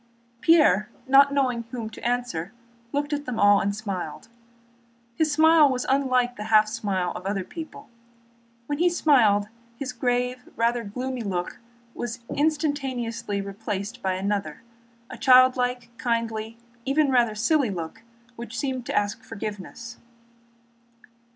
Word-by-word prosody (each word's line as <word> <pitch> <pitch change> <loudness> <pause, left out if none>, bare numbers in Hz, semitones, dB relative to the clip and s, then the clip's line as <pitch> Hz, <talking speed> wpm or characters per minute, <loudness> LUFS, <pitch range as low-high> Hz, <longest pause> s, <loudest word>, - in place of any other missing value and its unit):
Pierre, 255 - +4 0.2
not 275 +1 +6
knowing 260 -4 +1
whom 230 -2 -5
to - - -11
answer, 240 -7 -2 0.4
looked 290 +1 -1
at 290 0 -3
them 245 -3 -4
all 205 0 +6
and 200 +1 -1
smiled. 195 -5 -5 0.9
His 310 +3 +1
smile 315 0 +6
was 250 -1 -2
unlike 255 -2 +1
the 210 - -5
half 215 -1 +5
smile 195 -5 -2
of - - -7
other 195 -1 -1
people. 320 - -9 0.8
When 290 +3 -3
he 350 +1 +4
smiled, 235 - +3 0.3
his 260 -1 -4
grave, 250 +1 0
even - - -21
rather 235 +1 +1
gloomy, 250 +4 -4
look 180 -4 -3 0.3
was 240 0 -5 0.2
instantaneously 275 -9 -1
replaced 200 +1 -5
by 190 -1 0
another—a 230 +6 -6
childlike, 250 -1 +4
kindly, 230 -2 -2 0.3
even 280 +2 +2
rather 240 -4 +3
silly 255 +4 +2
look, 175 +3 -6 0.3
which 235 +1 -8
seemed 260 -3 -3
to - - -1
ask 205 +2 -1
forgiveness. 220 +2 -7
235 Hz, 130 wpm, -25 LUFS, 210-265 Hz, 0.9 s, not